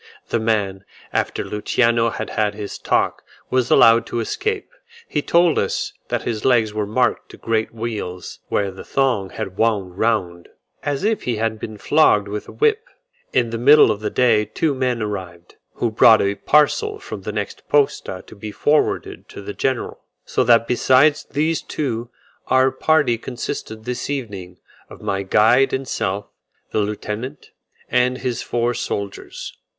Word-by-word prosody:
The 115 - +1
man, 105 -4 -1 0.3
after - - -1
Luciano 115 +2 +1
had - - -5
had 105 -1 0
his 105 -1 -6
talk, - - 0 0.3
was 130 -1 +1
allowed 115 0 +6
to 120 - -3
escape. 430 - -3 0.4
He 150 - -1
told 170 +1 +3
us - - -2
that - - -2
his 110 -3 -3
legs 115 -5 +3
were 105 -1 -2
marked 125 +4 0
by - - -11
great 110 -1 0
weals, 110 -6 -5
where 100 -1 0
the 95 - -10
thong 125 -8 0
had 95 +1 -6
wound 100 -5 0
round, 95 -7 0 0.3
as 145 +3 -2
if 220 +1 +1
he 120 - -1
had 110 0 -2
been 110 0 -7
flogged 105 -7 +3
with 105 +1 -5
a - - -9
whip. 450 +1 +1 0.4
In 120 -3 +1
the 115 - -3
middle 145 0 +7
of 105 - -3
the 105 -1 -2
day 115 -4 +3
two 145 +8 -1
men 125 -3 -1
arrived, 90 -4 -7 0.2
who 120 - -1
brought 110 0 +7
a 100 0 +1
parcel 150 - +2
from - - -8
the - - -4
next - - -5
posta 140 -10 +1
to - - -13
be 105 +1 -7
forwarded 150 +8 0
to - - -10
the 100 +1 -6
general: 130 +2 -2 0.3
so - - +1
that 115 -1 +5
besides 130 +4 +3
these 155 +3 0
two, 120 -5 -3 0.4
our 130 0 +4
party 130 -3 +2
consisted 110 -3 -6
this 125 +2 -4
evening 100 -10 -5 0.3
of - - -12
my 95 0 -1
guide 110 +7 +4
and 130 0 -2
self, 100 -4 -2 0.5
the - - 0
lieutenant, 105 +5 -4 0.4
and 125 +1 +2
his 125 -3 -3
four 120 0 0
soldiers. 100 -4 -5
115 Hz, 165 wpm, -21 LUFS, 105-130 Hz, 0.5 s, middle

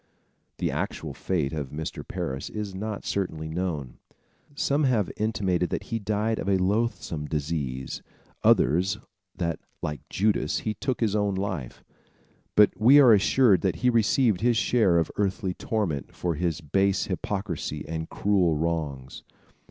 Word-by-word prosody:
The - - -1
actual - - -3
fate 80 -6 -1
of 75 -4 -3
Mr. 80 +2 -5
Parris 65 0 -4
is 105 -2 -5
not 105 +2 -5
certainly 80 -5 -2
known. 80 -6 -3 0.6
Some 145 +1 +1
have 115 -7 +1
intimated 95 -5 0
that - - -3
he 115 - 0
died 110 +2 -1
of 95 - -2
a 95 - +4
loathsome 95 -6 -1
disease, 70 -4 -3 0.4
others 90 +9 +3 0.4
that, 85 -3 -2 0.2
like 75 -4 -3
Judas, 105 +2 +1
he 110 - -2
took 125 +5 -3
his 110 -3 +1
own 105 -2 +1
life; 95 -10 -4 0.7
but 105 -1 +7
we 125 +7 +7
are 125 -5 +8
assured 105 -1 +4
that - - 0
he 125 - +6
received 115 -2 +3
his 120 0 +3
share 110 -7 +3
of 85 - +1
earthly 95 -1 0
torment 90 -10 -2
for 85 -1 -1
his 85 +1 -2
base 95 +5 +1
hypocrisy 95 -5 -3
and 80 0 -4
cruel 95 -6 +2
wrongs. 75 -5 -3
95 Hz, 145 wpm, -26 LUFS, 80-105 Hz, 0.7 s, are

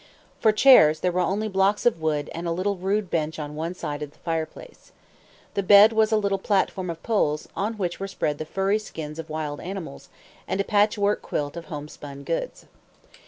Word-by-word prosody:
For 220 - +4
chairs 215 - +6
there 180 - +1
were 180 - -1
only 195 +5 0
blocks 195 +1 +1
of 225 -9 +2
wood 150 -2 -1
and 170 +1 -5
a - - 0
rude 195 +2 -1
bench 160 -1 -1
on 150 -1 -5
one 165 +4 -4
side 150 -4 -5
of 150 - -4
the - - -26
fireplace. 165 - -6 0.6
The 200 - 0
bed 205 +3 +7
was 220 0 +3
a 220 - +4
little 200 -2 0
platform 190 -2 0
of 165 -1 -6
poles, 155 -9 0
on 215 +3 -2
which 180 -4 -3
were 195 - -3
spread 150 -6 -2
the 155 - -4
furry 195 +5 0
skins 160 -7 -8
of 160 0 -7
wild 155 -2 -4
animals, 180 - -7 0.4
and 190 - -2
a - - +2
patchwork 205 0 +2
quilt 145 0 -3
of 170 -1 -7
homespun 145 -2 -8
goods. 165 +4 -4
180 Hz, 195 wpm, -25 LUFS, 155-205 Hz, 0.6 s, bed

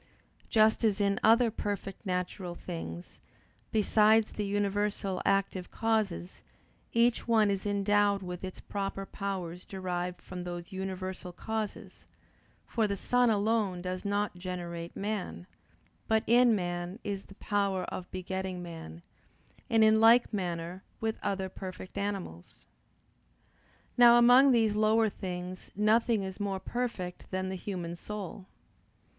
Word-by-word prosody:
Just 220 +1 +4
as 215 -2 +2
in 200 -1 +2
other 230 +1 +5
perfect 200 -1 -4
natural 180 0 -3
things, 90 - -7 0.5
besides 215 0 +4
the 210 -1 -3
universal 200 -1 -1
active 195 -2 +1
causes, 215 -5 -1 0.5
each 235 0 +2
one 220 -3 +4
is 195 +1 -2
endowed 205 0 +2
with 180 0 -6
its 185 -1 -6
proper 195 -1 -4
powers 185 -4 -4
derived 180 -2 -4
from 180 -1 -7
those 175 +1 -6
universal 190 -1 -5
causes: 215 0 -5 0.6
for 225 -3 0
the 200 -1 -2
sun 245 +4 +3
alone 210 -3 +1
does 185 +1 -4
not 205 -1 -1
generate 175 -2 -5
man; 195 - -3 0.6
but 220 0 +3
in 240 0 +5
man 175 0 -3
is 200 -1 -4
the 195 - -14
power 200 -3 0
of 180 - -6
begetting 185 0 -4
man: 160 - -9 0.7
and 225 -1 +5
in 220 0 +6
like 230 +2 +6
manner 175 -2 -3 0.2
with 220 0 -2
other 190 -1 -1
perfect 185 0 -8
animals. 195 - -5 1.3
Now 240 0 +9
among 245 +3 +7
these 225 -4 +4
lower 215 +1 +3
things 180 -1 -6
nothing 215 +1 +3
is 190 +1 -6
more 200 -2 -2
perfect 215 -7 -4
than 185 0 -2
the 190 - -3
human 175 -3 -4
soul. 195 0 -7
195 Hz, 130 wpm, -30 LUFS, 180-215 Hz, 1.3 s, Now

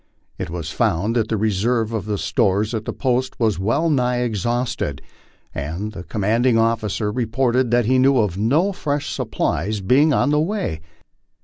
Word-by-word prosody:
It - - -4
was 85 -1 -5
found 100 +9 0
that 115 -2 +1
the 110 - -1
reserve 110 +2 0
of 105 -2 -2
stores 100 +6 +1
at 110 -1 -3
the - - -2
post 130 -1 -1
was 110 -5 +1
well 115 - +1
nigh 125 -5 +1
exhausted, 120 - -2 0.5
and 85 +9 -4
the 85 - -8
commanding 115 +5 +1
officer 110 -2 0
reported 125 +2 0
that 120 0 +2
he 130 +3 +3
knew 135 +1 +4
of 105 -7 +1
no 140 - +2
fresh 145 -6 -3
supplies 100 +7 -2
being 135 +11 +3
on 145 - +2
the 150 - +3
way. 170 - -2
115 Hz, 165 wpm, -21 LUFS, 105-130 Hz, 0.5 s, knew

